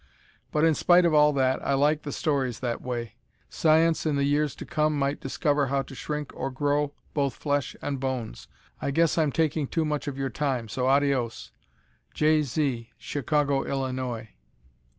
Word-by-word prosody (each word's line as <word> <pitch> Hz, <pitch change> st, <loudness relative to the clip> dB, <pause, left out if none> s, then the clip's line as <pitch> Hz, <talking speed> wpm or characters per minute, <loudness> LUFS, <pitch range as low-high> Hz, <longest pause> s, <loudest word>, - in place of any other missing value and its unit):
But 150 Hz, -, +1 dB
in 165 Hz, -, +4 dB
spite 175 Hz, +3 st, +4 dB
of 170 Hz, -, +3 dB
all 150 Hz, 0 st, +6 dB
that, 130 Hz, -1 st, +1 dB
I 140 Hz, -, +1 dB
like 150 Hz, +2 st, +2 dB
the 145 Hz, -, -6 dB
stories 135 Hz, -7 st, -1 dB
that 120 Hz, -2 st, -3 dB
way. 120 Hz, -3 st, -4 dB, 0.4 s
Science, 160 Hz, +1 st, +3 dB
in 155 Hz, -2 st, 0 dB
the 140 Hz, -, +1 dB
years 145 Hz, +1 st, +1 dB
to -, -, -8 dB
come 155 Hz, -1 st, 0 dB
might 140 Hz, +1 st, 0 dB
discover 145 Hz, +1 st, 0 dB
how 135 Hz, +1 st, 0 dB
to 135 Hz, -, -12 dB
shrink 150 Hz, +2 st, -4 dB
or 135 Hz, -, -3 dB
grow 145 Hz, +2 st, 0 dB, 0.2 s
both 140 Hz, -4 st, 0 dB
flesh 145 Hz, -2 st, -1 dB
and 140 Hz, -2 st, -2 dB
bones. 125 Hz, -, -4 dB, 0.3 s
I -, -, -1 dB
guess 165 Hz, +3 st, +2 dB
I'm 155 Hz, -3 st, +2 dB
taking 155 Hz, -1 st, 0 dB
too 160 Hz, +2 st, 0 dB
much 150 Hz, -1 st, -2 dB
of 140 Hz, -2 st, -4 dB
your 135 Hz, -2 st, -2 dB
time, 125 Hz, -3 st, -2 dB
so 125 Hz, +4 st, -1 dB
adios! 135 Hz, -4 st, +1 dB, 0.6 s
Jay 155 Hz, 0 st, +3 dB
Zee, 130 Hz, -4 st, -2 dB
Chicago, 145 Hz, -1 st, 0 dB
Illinois. 130 Hz, -4 st, -3 dB
140 Hz, 175 wpm, -26 LUFS, 130-150 Hz, 0.6 s, all